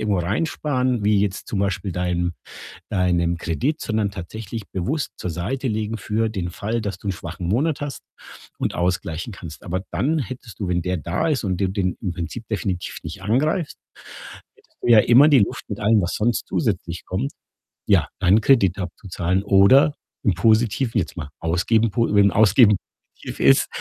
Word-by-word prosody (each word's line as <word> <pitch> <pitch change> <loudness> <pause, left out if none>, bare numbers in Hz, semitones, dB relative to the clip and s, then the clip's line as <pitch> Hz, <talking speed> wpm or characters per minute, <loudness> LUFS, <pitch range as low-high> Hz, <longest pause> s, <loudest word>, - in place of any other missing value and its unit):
irgendwo 105 -3 0
reinsparen, 125 - -1
wie 105 -1 +3
jetzt 100 -1 -2
zum 100 - -2
Beispiel 100 -1 -1
deinem 90 -1 -1 0.6
deinem 85 -3 +1
Kredit, 120 - -2
sondern 110 -2 -1
tatsächlich 105 +3 -7
bewusst 130 - -2
zur 90 - -4
Seite 115 - -3
legen 110 0 -2
für 110 +1 -1
den 95 -5 -3
Fall, 110 +6 -2
dass 100 -4 -4
du - - -8
'n - - +2
schwachen 90 0 -7
Monat 140 - 0
hast 145 -4 -5 0.6
und - - -1
ausgleichen 90 +3 -2
kannst. 80 -4 -10
Aber 95 +2 -3
dann 155 +4 0
hättest 125 -3 -7
du, 95 - -2
wenn 90 -1 +1
der 90 +1 -1
da 85 - -2
ist 145 -6 0
und 95 -3 -1
du 95 - +1
den 95 -2 -1
im 90 -4 -2
Prinzip 90 +7 -6
definitiv 95 -5 -3
nicht 80 +5 -7
angreift, 145 - 0 0.8
hättest - - -30
du - - -3
ja 115 -2 +8
immer 125 +7 +6
die 140 -5 +6
Luft 100 - -1
mit 100 - -4
allem, 105 0 +4
was 90 - -2
sonst 115 +2 0
zusätzlich 85 0 -2
kommt, 115 +10 -2 0.6
ja, - - +4
deinen 95 +3 +4
Kredit 100 -7 +3
abzuzahlen 90 0 -2
oder 100 +9 +5 0.3
im 100 - +3
Positiven 115 +5 +2
jetzt 85 - -5
mal 75 -3 -6
ausgeben 100 +7 +1
po 115 -1 0
wenn 100 -1 +5
Ausgeben 105 +2 +5 0.4
positiv - - -9
ist, 70 +1 +5
100 Hz, 175 wpm, -22 LUFS, 90-115 Hz, 0.8 s, ja